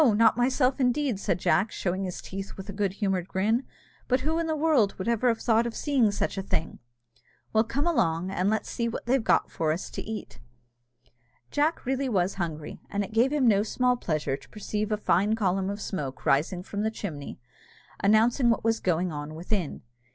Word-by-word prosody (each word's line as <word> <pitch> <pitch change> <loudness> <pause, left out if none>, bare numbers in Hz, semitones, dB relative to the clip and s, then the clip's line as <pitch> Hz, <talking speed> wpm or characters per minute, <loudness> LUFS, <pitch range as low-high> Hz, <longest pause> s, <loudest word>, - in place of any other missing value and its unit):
not 225 +1 +5
myself, 255 +2 +2
indeed," 250 -3 +1
said 170 - 0
Jack, 180 +4 +2
showing 190 +1 -2
his 180 - -6
teeth 195 +1 -7
with 190 0 -8
a 200 - -6
good 200 -1 -1
humoured 195 -3 -1
grin; 220 +7 +1 0.4
"but 255 0 +2
who 320 +4 0
in 335 - -1
the 315 - 0
world 295 -10 +3
would 190 - -4
ever 235 +1 +2
have 230 -2 +2
thought 230 0 +2
of 235 - -6
seeing 270 -7 +2
such 205 -1 -2
a - - -1
thing?" 165 -4 -2 0.7
"Well, 220 0 +5
come 265 +6 -2
along, 185 - +1
and 190 +1 +1
let's 220 0 0
see 235 -1 -2
what - - -5
they've 255 0 +2
got - - +2
for 160 -1 0
us 165 +4 -4
to - - -5
eat?" 220 0 -7 1.1
Jack 300 +3 +1
really 265 +1 0
was 190 -4 +1
hungry, 155 -3 -4
and 200 0 -1
it 200 - -8
gave 240 +4 +3
him 290 -4 +2
no 205 -3 +5
small 250 +3 +1
pleasure 155 - -1
to - - -15
perceive 210 0 -3
a 210 - +2
fine 205 +1 +2
column 195 -3 0
of 200 +1 -4
smoke 140 -10 -5
rising 165 +6 +2
from 205 +1 -4
the 220 - +1
chimney, 165 -10 -6 0.6
announcing 230 +5 +4
what 230 - +1
was 225 0 +2
going 180 0 0
on 150 +1 -6
within. 175 0 -3
210 Hz, 200 wpm, -27 LUFS, 185-240 Hz, 1.1 s, not